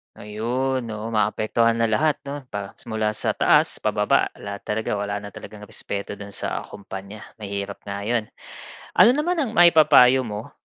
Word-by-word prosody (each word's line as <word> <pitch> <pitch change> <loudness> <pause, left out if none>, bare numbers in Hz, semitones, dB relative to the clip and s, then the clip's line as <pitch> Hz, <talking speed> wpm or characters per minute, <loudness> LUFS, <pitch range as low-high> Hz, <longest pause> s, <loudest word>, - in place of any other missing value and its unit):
Ayon, 120 +6 -2 0.2
oo, 110 +2 -5
maapektuhan 110 +2 +1
na 115 -1 +1
lahat, 150 +6 +2
‘no, 140 +1 -5
pa 100 -3 -6 0.2
mula 110 -1 0
sa 110 - -2
taas - - +3
pababa. - - +2
Lahat 100 -1 -7
talaga, 105 0 -2
wala 100 0 -2
na 100 - -9
talagang 105 +1 -11
respeto 100 0 -4
do’n 100 0 -10
sa - - -3
kompanya. 100 +1 -9 0.2
Mahirap 100 -2 -6
nga 100 0 -5
’yon. 110 +2 0 0.7
Ano 240 +3 +6
naman 335 +4 0
ang 230 -7 -2
maipapayo 155 -7 +7
mo, 105 0 -6
110 Hz, 160 wpm, -23 LUFS, 100-130 Hz, 0.7 s, maipapayo